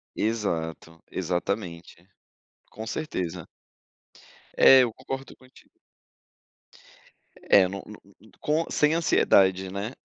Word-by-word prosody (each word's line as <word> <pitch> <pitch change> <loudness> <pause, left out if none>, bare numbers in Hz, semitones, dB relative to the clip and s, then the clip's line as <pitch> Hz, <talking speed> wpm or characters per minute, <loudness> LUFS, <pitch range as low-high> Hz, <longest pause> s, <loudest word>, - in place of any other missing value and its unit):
Exato, 80 -7 -3
exatamente. 90 -1 -4 0.6
Com 110 +1 -8
certeza. 95 - -4 1.1
É, 135 -1 +8
eu 115 -3 -2
concordo 135 +1 -7
contigo. 130 0 -22 1.8
É, 95 -2 +6
não 100 +1 -6
não 105 - -11 0.2
não 110 +2 -20
com 155 +2 0
sem 150 +1 +2
ansiedade, 95 - +3
né, 100 +6 -5
100 Hz, 95 wpm, -26 LUFS, 90-130 Hz, 1.8 s, É